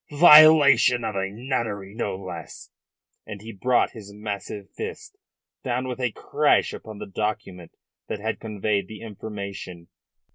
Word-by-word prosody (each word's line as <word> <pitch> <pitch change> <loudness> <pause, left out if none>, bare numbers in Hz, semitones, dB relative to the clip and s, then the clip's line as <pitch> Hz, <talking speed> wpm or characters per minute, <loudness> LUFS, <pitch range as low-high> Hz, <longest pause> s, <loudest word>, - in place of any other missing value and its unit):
Violation 150 -7 +8
of 110 - -3
a 95 0 -1
nunnery, 110 -4 -4
no 110 -4 -3
less." 90 -4 -9 0.6
And 105 -2 -7
he 110 +3 -9
brought 125 +4 +1
his 105 -3 -11
massive 105 -1 -6
fist 440 -1 -7 0.5
down 125 0 -2
with 125 0 -5
a 125 -2 0
crash - - +1
upon 110 -1 -9
the - - -7
document 100 -3 -5 0.3
that - - -3
had 110 +1 -3
conveyed 105 -2 -2
the 110 0 -10
information. 100 -5 -8
110 Hz, 140 wpm, -24 LUFS, 100-125 Hz, 0.6 s, Violation